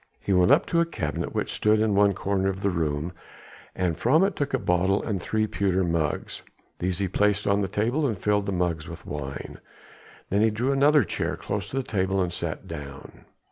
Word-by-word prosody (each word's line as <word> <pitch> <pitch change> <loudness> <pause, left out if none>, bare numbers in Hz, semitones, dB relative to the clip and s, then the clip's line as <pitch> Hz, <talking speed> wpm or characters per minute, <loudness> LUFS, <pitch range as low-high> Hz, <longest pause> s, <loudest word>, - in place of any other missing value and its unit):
He 100 - -1
went 90 -1 +4
up - - +5
to 170 - +1
a 170 - +4
cabinet 75 - -4
which - - -1
stood 105 0 +3
in 110 -1 +2
one 100 0 +4
corner 95 0 0
of 95 0 -4
the 100 - +1
room, 80 0 -2 0.6
and 90 -3 0
from 150 - +3
it 195 0 +1
took 145 -1 -2
a 130 - +2
bottle 95 -2 +1
and 100 -5 -2
three 110 +4 0
pewter 95 -3 0
mugs. 85 -3 -2 0.4
These 90 0 -1
he 100 0 0
placed 105 +2 +1
on 100 +1 +2
the 95 - 0
table 120 - 0
and 110 -6 -2
filled 105 +1 0
the - - 0
mugs 90 -4 -1
with 85 - -10
wine. 70 -2 -6 0.7
Then 100 +2 +3
he 110 - +5
drew 120 +5 0
another 145 +2 +5
chair - - -2
close 100 0 -4
to 135 - -4
the 135 - 0
table 95 -5 0
and 90 -2 0
sat - - -4
down. 70 -2 -9
100 Hz, 215 wpm, -26 LUFS, 90-110 Hz, 0.7 s, up